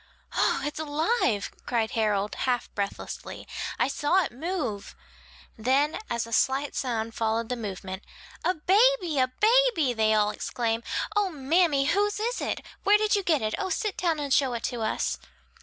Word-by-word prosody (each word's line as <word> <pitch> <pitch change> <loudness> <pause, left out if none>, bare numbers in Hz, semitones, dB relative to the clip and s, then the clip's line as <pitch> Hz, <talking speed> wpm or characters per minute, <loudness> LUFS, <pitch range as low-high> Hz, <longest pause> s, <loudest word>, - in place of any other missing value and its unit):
"Oh, - - +2
it's 295 +1 -3
alive," 305 - 0 0.2
cried 230 -2 0
Harold, 210 -2 0
half 245 -2 -1
breathlessly, 200 -1 -5 0.3
"I - - +2
saw 295 +7 +2
it - - -4
move!" 275 - -4 0.6
Then 270 +7 +2
as 235 -1 -1
a 230 - -8
slight 270 +5 +1
sound 230 -4 -2
followed 225 0 -1
the 250 - -1
movement, 195 -4 -6 0.4
"A 365 - +2
baby! 375 - +3
a 255 - +4
baby!" 430 - +3
they 220 -1 +3
all 210 -1 +3
exclaim, 230 0 -2 0.3
"O, 410 -2 +2
mammy, 300 -1 +2
whose 410 +6 +1
is 470 +3 -1
it? - - -2 0.2
where 410 +1 +6
did 425 0 +2
you 405 - +1
get 315 - +1
it? 215 - -1
oh, 385 -1 -2
sit 420 +2 -1
down 335 -4 0
and 285 -2 -1
show 270 -3 +3
it 235 - -4
to 240 -2 -2
us!" 220 - -1
275 Hz, 170 wpm, -27 LUFS, 225-365 Hz, 0.6 s, where